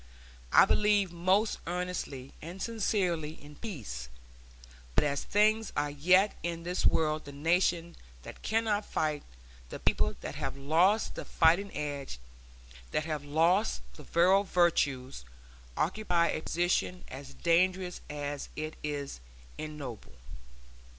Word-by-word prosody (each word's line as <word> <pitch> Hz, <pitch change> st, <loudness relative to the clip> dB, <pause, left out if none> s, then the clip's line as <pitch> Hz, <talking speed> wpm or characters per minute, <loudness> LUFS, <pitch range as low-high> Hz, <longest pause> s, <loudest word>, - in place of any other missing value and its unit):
I -, -, +8 dB
believe 205 Hz, -3 st, +3 dB
most 185 Hz, +5 st, +2 dB
earnestly 175 Hz, -7 st, -4 dB
and 175 Hz, +4 st, -8 dB
sincerely 185 Hz, -8 st, 0 dB
in 145 Hz, +1 st, -13 dB
peace, 105 Hz, -, -6 dB, 0.9 s
but -, -, +4 dB
as 140 Hz, -1 st, 0 dB
things 215 Hz, +1 st, +2 dB
are 145 Hz, -, 0 dB
yet 185 Hz, +8 st, +4 dB
in 170 Hz, -1 st, -3 dB
this 180 Hz, +2 st, +1 dB
world 155 Hz, -1 st, +1 dB
the 140 Hz, -, -8 dB
nation 170 Hz, +3 st, +1 dB, 0.3 s
that -, -, -10 dB
cannot 220 Hz, -1 st, +1 dB
fight, 150 Hz, -5 st, -1 dB, 0.5 s
the -, -, -6 dB
people 70 Hz, 0 st, +1 dB
that -, -, -5 dB
have -, -, -4 dB
lost 170 Hz, +10 st, +3 dB
the -, -, -6 dB
fighting 175 Hz, +5 st, +3 dB
edge, 145 Hz, -, -4 dB, 0.7 s
that 155 Hz, -, -1 dB
have 155 Hz, -3 st, -3 dB
lost 165 Hz, +8 st, +2 dB
the -, -, -11 dB
virile 185 Hz, +7 st, +4 dB
virtues, 140 Hz, -, +1 dB, 0.5 s
occupy 175 Hz, -1 st, +1 dB
a -, -, -1 dB
position 175 Hz, +2 st, 0 dB
as 135 Hz, +1 st, -9 dB
dangerous 180 Hz, +1 st, +1 dB
as 145 Hz, -1 st, -4 dB
it 155 Hz, +1 st, -5 dB
is 145 Hz, -, -4 dB, 0.4 s
ignoble. 150 Hz, -7 st, -7 dB
165 Hz, 125 wpm, -30 LUFS, 145-185 Hz, 0.9 s, I